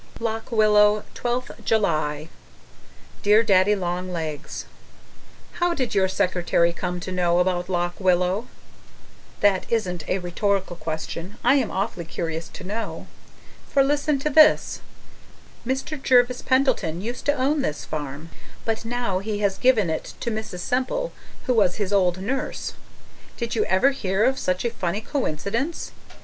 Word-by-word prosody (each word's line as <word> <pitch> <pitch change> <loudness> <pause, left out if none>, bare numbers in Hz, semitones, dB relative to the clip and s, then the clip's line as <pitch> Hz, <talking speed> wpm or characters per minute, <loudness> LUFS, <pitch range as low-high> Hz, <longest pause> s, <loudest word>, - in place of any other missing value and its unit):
LOCK 225 +1 -3
WILLOW, 210 -1 +4
12th 245 +1 -3
July 155 -8 0 0.9
Dear 210 +2 +5
Daddy 200 -1 +4
Long 180 -1 -3
Legs, 160 -4 -5 0.9
How 350 -1 +2
did 255 -5 -2
your 190 -2 +3
secretary 175 -2 +1
come 180 0 -3
to 185 - -5
know 175 -1 +2
about 180 0 +1
Lock 175 -1 -1
Willow? 185 +4 +2 0.9
(That 200 -3 +2
isn't 180 -8 -1
a 185 - +2
rhetorical 190 +1 -1
question. 165 +4 -5
I - - +5
am 255 -6 +1
awfully 190 -3 -2
curious 165 0 -4
to - - -10
know.) 215 +4 -4 0.6
For 275 - +4
listen 290 +1 +1
to 300 - +2
this: 310 +1 +5 0.9
Mr. 270 +3 -2
Jervis 250 -1 +4
Pendleton 260 - +1
used 240 +4 -5
to 290 - +5
own 285 +2 +1
this 150 - -3
farm, 150 +1 -6 0.3
but 225 0 -1
now 230 -5 -1
he 210 +1 -3
has 195 -2 0
given 220 -9 +3
it 160 - -4
to 235 - -1
Mrs. 215 -5 -5
Semple 260 - -1 0.3
who 255 - +2
was 195 -6 +3
his 205 -1 -2
old 180 -3 +3
nurse. 255 +8 -3 0.6
Did 235 -1 -3
you 220 - +1
ever 190 +10 +3
hear 200 -6 0
of 265 +1 +2
such 185 +4 -1
a 235 - +1
funny 195 -2 -2
coincidence? 235 - -2
205 Hz, 145 wpm, -24 LUFS, 180-245 Hz, 0.9 s, Dear